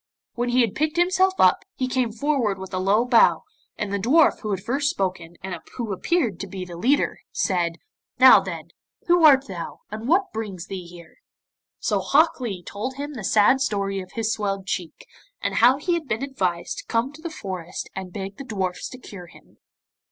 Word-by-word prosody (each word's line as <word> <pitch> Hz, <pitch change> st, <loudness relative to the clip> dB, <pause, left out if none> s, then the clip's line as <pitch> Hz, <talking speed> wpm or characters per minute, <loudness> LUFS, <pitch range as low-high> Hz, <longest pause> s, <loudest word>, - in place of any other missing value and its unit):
When 245 Hz, +1 st, -2 dB
he 250 Hz, +1 st, +3 dB
had 230 Hz, -5 st, +1 dB
picked 310 Hz, +2 st, -1 dB
himself 375 Hz, +2 st, +3 dB
up, -, -, +4 dB
he 255 Hz, -, -1 dB
came 255 Hz, -3 st, 0 dB
forward 235 Hz, -4 st, 0 dB
with 190 Hz, 0 st, -9 dB
a 185 Hz, -, -1 dB
low 200 Hz, +5 st, +2 dB
bow, 245 Hz, -2 st, +4 dB, 0.3 s
and 205 Hz, -1 st, -3 dB
the 200 Hz, -, 0 dB
dwarf 285 Hz, +10 st, +4 dB
who 215 Hz, -, -5 dB
had 190 Hz, -2 st, -2 dB
first 275 Hz, +5 st, 0 dB
spoken 180 Hz, -5 st, -3 dB
and 185 Hz, -3 st, -5 dB
who 230 Hz, -5 st, -3 dB
appeared 235 Hz, -, 0 dB
to 200 Hz, -, -5 dB
be 185 Hz, -1 st, -6 dB
the 175 Hz, -1 st, -9 dB
leader, 255 Hz, +12 st, +1 dB
said, 175 Hz, -4 st, 0 dB, 0.4 s
'Now, -, -, +9 dB
then, -, -, -7 dB, 0.4 s
who 350 Hz, -1 st, +4 dB
art 275 Hz, -3 st, +7 dB
thou, 180 Hz, -7 st, -7 dB
and 220 Hz, +2 st, -6 dB
what 375 Hz, +6 st, +2 dB
brings 200 Hz, -6 st, -5 dB
thee 185 Hz, -3 st, -7 dB
here?' 170 Hz, -1 st, -14 dB, 0.6 s
So -, -, 0 dB
Hok 310 Hz, +2 st, +3 dB
Lee 200 Hz, -8 st, -4 dB
told 220 Hz, +9 st, -5 dB
him 290 Hz, +2 st, -5 dB
the 240 Hz, -6 st, -7 dB
sad 215 Hz, +7 st, +4 dB
story 200 Hz, -5 st, -1 dB
of 185 Hz, -, -12 dB
his 225 Hz, -1 st, -1 dB
swelled 195 Hz, -2 st, -3 dB
cheek, 185 Hz, -, -5 dB, 0.3 s
and -, -, -2 dB
how 250 Hz, +3 st, +6 dB
he 350 Hz, +5 st, -1 dB
had 335 Hz, -4 st, -2 dB
been 225 Hz, +2 st, -2 dB
advised 185 Hz, -11 st, -2 dB
to -, -, -10 dB
come 240 Hz, +5 st, 0 dB
to 310 Hz, -, -13 dB
the 335 Hz, -, -4 dB
forest 185 Hz, -, -6 dB
and 190 Hz, -1 st, -6 dB
beg 195 Hz, +1 st, -6 dB
the -, -, -7 dB
dwarfs 190 Hz, -7 st, -3 dB
to 255 Hz, -, -10 dB
cure 195 Hz, -8 st, -11 dB
him. -, -, -20 dB
220 Hz, 205 wpm, -24 LUFS, 190-270 Hz, 0.6 s, Now